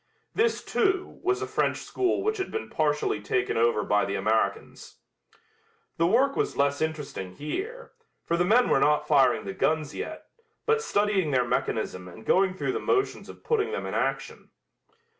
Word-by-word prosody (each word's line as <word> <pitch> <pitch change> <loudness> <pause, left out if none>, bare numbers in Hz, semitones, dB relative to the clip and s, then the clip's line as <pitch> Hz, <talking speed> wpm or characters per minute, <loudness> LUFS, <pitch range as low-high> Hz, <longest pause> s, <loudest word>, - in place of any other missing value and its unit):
This, 455 +1 +1
too, 385 -2 0
was 380 +1 0
a - - -1
French - - 0
school 380 0 -1
which 435 +1 0
had 380 - -3
been 445 - -5
partially 150 -8 0
taken 125 +4 -1
over 115 -2 +2
by 105 0 +2
the 100 - -2
Americans. 110 +3 -1 1.0
The 165 - +3
work 265 +8 +3
was - - -1
less 140 +1 +1
interesting 150 -12 -4
here, 430 - -5 0.3
for 170 - 0
the 175 - +2
men 230 +7 +4
were - - +3
not 150 +1 +2
firing 135 -7 +3
the 95 - -4
guns 155 +7 0
yet, - - -6 0.4
but 450 0 +2
studying 205 - +1
their 130 -3 +2
mechanism 90 -5 -2
and 90 +5 -12
going 190 0 +3
through 190 - -1
the 435 - -2
motions 400 -1 0
of - - -12
putting 445 -2 0
them 470 - -3
in - - -4
action. - - -2
160 Hz, 175 wpm, -27 LUFS, -, 1.0 s, men